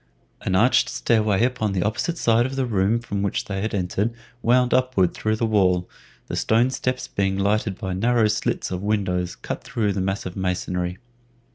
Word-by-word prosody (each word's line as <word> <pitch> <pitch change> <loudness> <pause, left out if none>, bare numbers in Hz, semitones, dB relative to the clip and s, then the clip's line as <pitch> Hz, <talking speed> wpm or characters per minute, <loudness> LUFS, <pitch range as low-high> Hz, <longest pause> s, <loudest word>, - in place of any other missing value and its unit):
An 95 - -1
arched 115 +7 +4
stair 115 -2 +1
way 105 0 +2
upon 115 -5 -1
the 90 -2 0
opposite 110 - -1
side 120 -2 +3
of 135 - -6
the 135 -1 0
room 105 0 +1
from 100 -4 -3
which 100 -1 -1
they 95 -1 -3
had 110 0 -2
entered 100 +4 -1 0.3
wound 125 +1 +3
upward 125 -9 +2
through 110 0 -1
the 115 - 0
wall, 95 -5 +2 0.4
the - - -5
stone 115 +4 +2
steps 130 -1 -2
being 95 -1 -1
lighted 100 0 0
by 95 -4 -4
narrow 115 +3 +2
slits 105 - -1
of 90 0 -3
windows 90 -4 -1
cut - - -6
through 105 -3 -1
the 95 - -2
massive 95 -1 -3
masonry. 90 -1 -2
105 Hz, 185 wpm, -23 LUFS, 95-115 Hz, 0.4 s, arched